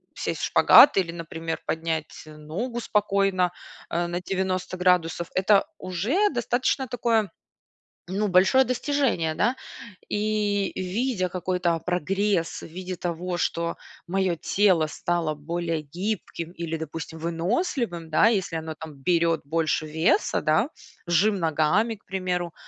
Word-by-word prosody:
сесть - - -3
в - - +1
шпагат, 285 - +7
или, 175 -3 +1
например, 165 -1 -5
поднять 160 -1 -3
ногу 155 +11 -5
спокойно, 195 -4 +1 0.4
э, 175 +1 -1
на 175 +1 -3
90 185 0 -2
градусов- 180 -2 +1
это 195 +2 +4
уже 220 - +1
достаточно 250 - 0
такое, 230 -4 0 0.8
ну, 200 +3 0
большое 190 +8 +5
достижение, 255 - 0
да. 235 +4 +2 0.5
И, 205 -1 0
видя 190 +1 -1
какой-то 180 -1 -1
прогресс 180 +1 -1
в - - -7
виде 180 +2 -6
того, 175 +1 -3
что 170 0 -1 0.3
мое 190 -2 +1
тело 185 -4 +2
стало 165 -1 -1
более 165 +1 -3
гибким 170 +1 -4
или, 170 -2 -4
допустим, 160 0 -7
выносливым, 175 - -2
да, 155 - +5
если 195 -6 +1
оно 160 0 -5
там 155 -1 -9
берет 165 +2 +1
больше 160 +1 0
веса, 160 +3 +1
да, 155 - +2 0.4
жим 195 +5 +3
ногами, 165 +7 +1
к 200 - -21
примеру. 180 -2 -2
180 Hz, 125 wpm, -25 LUFS, 165-205 Hz, 0.8 s, шпагат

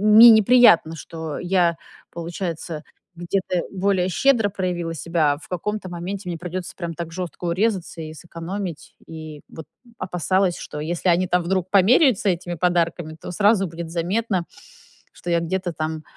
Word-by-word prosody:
мне 235 +2 +11
не 220 -1 +6
приятно, 215 -9 +6
что 160 -2 -6
я 175 -2 +2 0.3
получается, 170 -2 -5 0.3
где-то 175 +1 -1
более 190 -1 +1
щедро 235 +1 +3
проявила 175 -4 -3
себя, 160 -2 +1
а - - -6
в - - -14
каком-то 190 +2 -3
моменте 180 +2 -5
мне 170 - -3
придётся 180 +1 -5
прямо 170 -2 -4
так 170 0 -6
жёстко 180 0 -6
урезаться, 185 -2 -1
и 155 0 -7
сэкономить, 170 +1 -7
и 155 -2 -9
вот 160 - -10 0.3
опасалась, 185 0 0
что 150 - -7
если 170 +4 -1
они 180 +2 +3
там 180 +1 +2
вдруг 185 0 -1
померяются 210 - +4
этими 175 -1 -2
подарками, 170 -2 0
то - - -6
сразу 200 +1 +3
будет 165 0 -7
заметно, 185 +2 -1 0.7
что 175 - -8
я 170 - +3
где-то 180 +1 -2
там, 155 0 -4
175 Hz, 155 wpm, -22 LUFS, 165-190 Hz, 0.7 s, мне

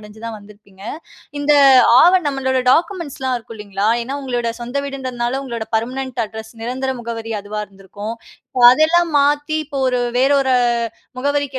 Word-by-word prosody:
அடச்சி 210 +1 -14
தான் 225 -1 -6
வந்துருப்பீங்க. 205 -1 -18 0.6
இந்த 290 +1 +2 0.5
ஆவணம் 350 +2 +6
நம்பளோட 265 -2 0
டாக்குமெண்ட்ஸ்லாம் 290 -8 -1
இருக்கு 230 0 -12
இல்லங்களா, 205 0 -2
ஏன்னா 265 +4 -5
உங்களோட 245 -3 -2
சொந்த 240 +3 -5
வீடுன்றதுனால 260 -2 -3
உங்களோட 235 -4 -5
பெர்மனன்ட் 255 +2 -3
அட்ரஸ், 220 +1 -10
நிரந்தர 260 +3 -3
முகவரி 230 -1 -5
அதுவா 210 +1 -5
இருந்துருக்கும் 205 +3 -8 0.5
அதெல்லாம் 325 +6 +3
மாத்தி 290 +2 +2
இப்ப 280 -1 -6
ஒரு 250 -1 +1 0.2
வேறு 265 +3 +3
ஒரு 265 -1 +1 0.6
முகவரிக்கு 285 0 -1
255 Hz, 140 wpm, -18 LUFS, 220-275 Hz, 0.6 s, ஆவணம்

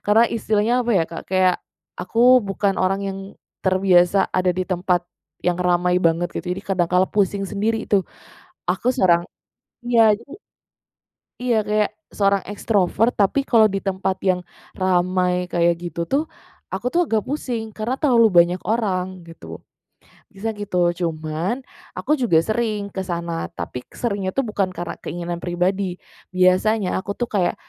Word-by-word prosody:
karena 215 +3 +5
istilahnya 215 +2 +1
apa 240 - -1
ya - - +3
Kak, 165 - -6
kayak, 185 -1 +3 0.5
aku 205 +5 -5 0.3
bukan 195 0 0
orang 195 +1 +1
yang 195 0 -5 0.5
terbiasa 185 0 +4 0.2
ada 185 0 +2
di 185 - +2
tempat 180 -1 0 0.5
yang 175 0 +1
ramai 180 0 +2
banget 165 +2 +1
gitu. - - -5
Jadi 195 +2 -6
kadang 180 -3 +1
kala 180 +1 +5
pusing 200 -1 0
sendiri 215 +3 -1
tuh, 200 -2 +4 0.7
aku - - -1
seorang 170 -4 +3 0.6
iya, 240 -1 +3 0.2
jadi 235 +4 -16 1.1
iya 240 -3 +1
kayak, 210 0 +1 0.2
seorang 200 -1 +1
ekstrover 205 +1 +1
tapi 240 +7 +1
kalau 220 -3 +5
di 195 - -1
tempat 190 -1 -2
yang 185 -2 0 0.3
ramai 180 -1 +1
kayak 170 -1 +1
gitu 170 -1 -4
tuh, 275 - 0 0.4
aku 215 +6 -4
tuh 345 -1 +2
agak 220 -2 +1
pusing, 240 -6 -4
karena 220 +4 -3
terlalu 240 -6 +5
banyak 175 +1 +4
orang 185 -5 -1
gitu, 165 - -11 0.6
bisa 210 +3 -5
gitu. 180 -4 0
Cuman 170 +6 -3 0.3
aku 300 -1 0
juga 220 -11 +3
sering 215 -1 -2
ke 190 - -4
sana, 170 -2 -3
tapi 125 - -7
k - - -24
seringnya 200 -5 -2
itu 275 - +1
bukan 205 -5 -1
karena 175 - -5
keinginan 175 0 -4
pribadi. 180 +1 -1 0.4
Biasanya 185 +3 +2
aku 200 +2 -4
tuh 240 - -2
kayak 190 -4 +1
190 Hz, 150 wpm, -21 LUFS, 180-215 Hz, 1.1 s, karena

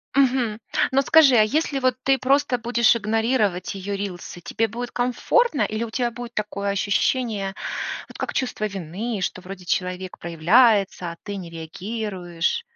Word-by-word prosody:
Мгм. 250 -5 +2 0.3
Но 270 +1 +4
скажи, 275 0 +6
а 220 - +7
если 280 +3 0
вот 255 -2 +2
ты 270 -1 +3
просто 265 -1 +2
будешь 235 0 +3
игнорировать 215 -4 0
ее 200 +1 -4
рилсы, 180 -3 -6
тебе 225 +5 -1
будет 240 +3 -6
комфортно 275 - +1
или 215 +2 -2
у 230 - -4
тебя 240 +1 -1
будет 240 +1 -8
такое 200 -1 -2
ощущение, 200 0 0 0.5
вот - - -12
как - - -3
чувство 245 -5 -1
вины, 195 +3 -4
что 185 - -2
вроде 185 -1 -9
человек 180 +1 -2
проявляется, 185 +2 +3
а 170 - -10
ты 205 -1 -5
не 175 -3 -7
реагируешь? 180 - -3
215 Hz, 155 wpm, -23 LUFS, 190-245 Hz, 0.5 s, а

